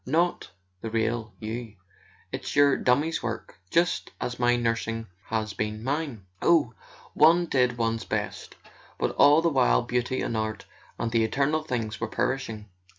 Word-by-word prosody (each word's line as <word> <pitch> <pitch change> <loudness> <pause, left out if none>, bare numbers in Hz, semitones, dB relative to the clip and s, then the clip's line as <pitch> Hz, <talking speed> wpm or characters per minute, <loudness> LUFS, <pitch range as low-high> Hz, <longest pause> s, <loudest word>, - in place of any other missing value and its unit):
"Not 170 +6 0 0.3
the 115 - -4
real 110 0 -1
you. 110 0 -5 0.6
It's - - -5
your 145 -1 +5
dummy's 145 +6 +1
work—just 115 - -1
as 125 0 -4
my 120 0 +4
nursing 115 -1 -1 0.2
has 110 -1 -2
been 110 0 -3
mine. 135 -6 -3 0.2
Oh, 155 -9 +3 0.4
one 170 +3 +5
did 125 -6 +1
one's 115 -1 0
best— - - -4 0.4
but - - 0
all 145 +3 +5
the 170 - +4
while - - +3
beauty 125 +1 -1
and 115 - -2
art 110 -1 -3 0.3
and 115 - -2
the 115 -1 +3
eternal 140 +7 +1
things 115 -8 -3
were 115 - 0
perishing! 110 -3 -2
120 Hz, 150 wpm, -27 LUFS, 110-145 Hz, 0.6 s, your